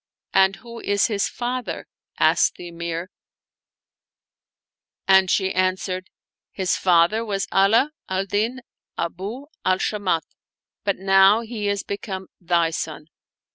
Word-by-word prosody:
" - - -47
And 190 +1 +1
who 235 +3 -11
is 200 -2 +1
his 205 -2 0
father? 250 0 -4 0.2
" - - -69
asked - - +4
the 175 - -9
Emir; 170 +1 -5 2.0
and 190 -1 +6
she 190 0 +1
answered, 185 0 -1 0.2
" - - -70
His 185 - +2
father 180 +5 +3
was 200 -3 -2
Afe 220 +9 +4 0.2
al 190 +1 0
Din 220 +6 -1 0.4
Abu 200 +10 -4 0.2
al 185 - +3
Shamat, 190 -5 0 0.6
but 200 -1 0
now 195 +3 +5
he 220 -3 -4
is 200 0 -1
become 195 -2 -5
thy 170 -2 +1
son." 155 -1 -5
195 Hz, 135 wpm, -23 LUFS, 185-210 Hz, 2.0 s, and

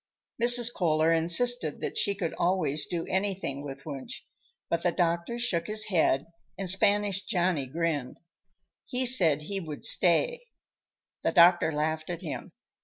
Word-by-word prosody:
Mrs. 240 0 +6
Kohler 160 -2 +1
insisted 170 +3 +2
that - - -4
she 200 - +1
could 180 -5 -4
always 175 -5 0
do 170 -2 -4
anything 190 -8 -3
with 135 -1 -9
Wunsch, 140 -4 -7 0.4
but 170 - -2
the 175 - 0
doctor 170 +6 -2
shook 185 -9 -2
his 215 0 +1
head 160 -6 +1 0.3
and 195 - -5
Spanish 200 +1 +2
Johnny 175 -7 -1
grinned. 150 -3 -3 0.7
He 255 +1 -2
said 165 - +4
he 195 +5 -5
would 155 -5 -9
stay. 480 - +2 0.8
The - - -1
doctor 175 -2 +4
laughed 155 +1 -3
at 175 +1 -6
him. 160 - -7
175 Hz, 145 wpm, -27 LUFS, 155-200 Hz, 0.8 s, Mrs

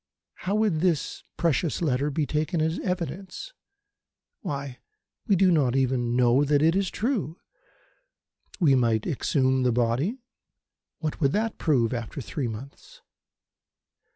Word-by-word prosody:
"How 195 +2 -3
would 210 -7 +2
this 165 -6 0 0.2
precious 165 -2 +1
letter 145 -3 +1
be 150 +1 -1
taken 155 +4 -1
as 160 +2 0
evidence? 185 - -4 0.9
Why, 140 -3 -5 0.5
we 200 - +4
do 185 0 +4
not 135 -7 +2
even 125 -3 +1
know 125 +2 +4
that 145 0 +2
it 165 +2 +4
is 195 -1 +1
true. 215 - -2 1.2
We 155 -7 +5
might 115 -4 +2
exhume 130 -1 +1
the 125 -1 +2
body: 125 - 0 0.8
what 155 +1 -3
would 140 -2 +3
that 220 +1 -1
prove 130 -7 +2
after 120 +3 -5
three 135 +1 -3
months? 140 - -10
150 Hz, 130 wpm, -26 LUFS, 130-180 Hz, 1.2 s, We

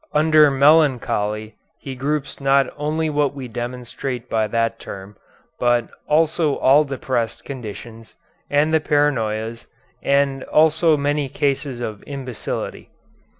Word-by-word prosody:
Under 155 -1 +5
melancholy 130 -7 +2 0.2
he 135 - -7
groups 140 +2 -3
not 135 0 +4
only 155 +2 -1
what 145 -2 0
we 135 -2 -6
denominate 125 +1 -5
by 110 -1 +1
that 115 +1 -1
term, 100 +1 -9 0.4
but 120 -1 +2 0.2
also 155 -1 +2
all 140 +3 +5
depressed 130 -4 -3
conditions, 115 -3 -9 0.3
and 150 +2 +2
the 160 - +5
paranoias, 115 -7 0 0.3
as 140 -1 +1
also 160 0 +4
many 145 0 -1
cases 140 -2 -1
of 110 -3 -5
imbecility. 130 -5 -5
135 Hz, 115 wpm, -21 LUFS, 120-150 Hz, 0.4 s, Under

